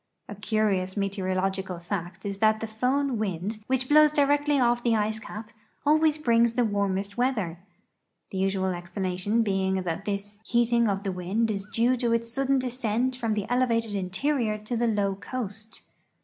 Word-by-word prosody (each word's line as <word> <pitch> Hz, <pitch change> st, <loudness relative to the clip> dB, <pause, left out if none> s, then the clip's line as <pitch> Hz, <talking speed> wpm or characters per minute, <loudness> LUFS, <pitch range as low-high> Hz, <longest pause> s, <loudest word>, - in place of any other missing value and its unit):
A -, -, -7 dB
curious 205 Hz, -2 st, 0 dB
meteorological 190 Hz, -1 st, -1 dB
fact 175 Hz, +1 st, -5 dB
is 200 Hz, -1 st, -4 dB
that 220 Hz, 0 st, +3 dB
the 225 Hz, -, -3 dB
Fohn 250 Hz, +4 st, 0 dB
wind, 200 Hz, +1 st, -3 dB
which 260 Hz, 0 st, +1 dB
blows 300 Hz, +1 st, +6 dB
directly 290 Hz, 0 st, +2 dB
off 240 Hz, -1 st, +2 dB
the 235 Hz, -2 st, +3 dB
ice 215 Hz, 0 st, 0 dB
cap, 215 Hz, 0 st, -8 dB, 0.3 s
always 310 Hz, +1 st, +4 dB
brings 235 Hz, -5 st, +3 dB
the 245 Hz, 0 st, +2 dB
warmest 200 Hz, 0 st, -1 dB
weather; 210 Hz, -10 st, 0 dB, 0.7 s
the 190 Hz, -, -3 dB
usual 190 Hz, -1 st, 0 dB
explanation 185 Hz, +4 st, -1 dB
being 190 Hz, -2 st, 0 dB
that 175 Hz, +2 st, -3 dB
this 205 Hz, 0 st, -4 dB
heating 235 Hz, 0 st, +2 dB
of 195 Hz, 0 st, -1 dB
the 195 Hz, -, -1 dB
wind 190 Hz, +5 st, -1 dB
is 200 Hz, 0 st, -4 dB
due 240 Hz, +3 st, +2 dB
to 235 Hz, -1 st, +1 dB
its 230 Hz, 0 st, -1 dB
sudden 275 Hz, +1 st, +2 dB
descent 250 Hz, -1 st, -1 dB
from 230 Hz, -4 st, -1 dB
the 205 Hz, -2 st, -2 dB
elevated 230 Hz, -3 st, +1 dB
interior 215 Hz, +5 st, 0 dB
to 215 Hz, +3 st, -5 dB
the 235 Hz, +1 st, +1 dB
low 205 Hz, -3 st, +1 dB
coast. 220 Hz, 0 st, -6 dB
215 Hz, 165 wpm, -27 LUFS, 195-240 Hz, 0.7 s, blows